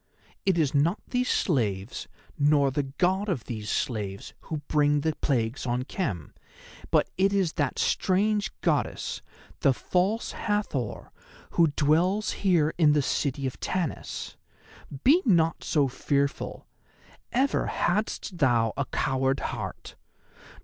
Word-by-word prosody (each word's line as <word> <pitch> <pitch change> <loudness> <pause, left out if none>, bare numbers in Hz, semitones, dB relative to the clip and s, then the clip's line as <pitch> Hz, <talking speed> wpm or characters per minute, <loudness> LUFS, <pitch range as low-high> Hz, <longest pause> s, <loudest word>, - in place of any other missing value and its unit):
It 190 -3 +3
is 150 -5 +2
not 160 +7 +2
these 250 0 0
slaves, 105 - 0 0.3
nor 145 -1 +3
the 145 - 0 0.2
God 190 +3 +1
of 145 - -1
these 110 -3 -5
slaves, 100 -5 -3
who 155 -2 -4
bring 145 -1 +3
the 160 0 0
plagues 125 -1 -1
on 125 +1 0
Khem, 105 - -4 0.6
but - - +3
it 195 +1 +4
is 190 -5 +1
that 145 -4 -1
strange 205 +2 +1
Goddess, - - -1 0.4
the 135 - +3
False 190 - 0
Hathor, 205 - -2 0.4
who 170 - +4
dwells 175 +8 +2
here 170 -6 +3
in 150 -3 +6
the 150 -1 +2
city 140 0 -1
of 130 - -4
Tanis. 180 -6 -3 0.7
Be 315 +7 +6
not 165 -8 +2
so 145 -3 +2
fearful—ever 140 - -2
hadst 190 -1 -1
thou 120 -5 +3
a 140 - -1
coward 135 +1 0
heart. - - -7
150 Hz, 125 wpm, -27 LUFS, 130-185 Hz, 0.7 s, in